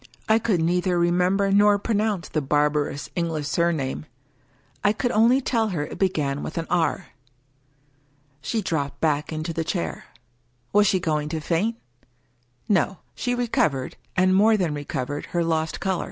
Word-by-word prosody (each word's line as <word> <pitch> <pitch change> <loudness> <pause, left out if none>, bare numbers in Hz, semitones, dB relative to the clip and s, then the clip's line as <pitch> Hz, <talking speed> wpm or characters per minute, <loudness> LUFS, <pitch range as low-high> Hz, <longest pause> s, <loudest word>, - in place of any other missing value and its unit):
I 220 +1 +4
could 215 -6 +1
neither 180 +2 +1
remember 180 +3 +2
nor 205 +1 +5
pronounce 210 -4 -1
the 155 - -1
barbarous 145 0 0
English 165 -4 -2
surname. 155 -4 -1 0.8
I 205 - +4
could 245 +3 -1
only 235 +5 +4
tell 230 -4 +1
her 165 -8 -2
it - - -9
began 150 -7 0
with 155 - -6
an 165 - -1
" - - -29
R." - - -3 1.3
She 225 -3 -2
dropped 145 -6 -2
back 150 -1 0
into 155 +1 -3
the 165 0 -1
chair. 85 - -3 0.7
Was 205 0 +5
she 190 - +2
going 150 -3 -1
to 160 0 -2
faint? 175 +9 0 0.9
No: 190 -1 +2 0.2
she 245 -1 -1
recovered, 190 - 0 0.2
and 185 0 +4
more 215 +3 +5
than 175 -6 0
recovered, 145 -1 -4
her 170 -1 0
lost 160 -1 -1
color. 190 -2 -1
170 Hz, 155 wpm, -24 LUFS, 150-205 Hz, 1.3 s, nor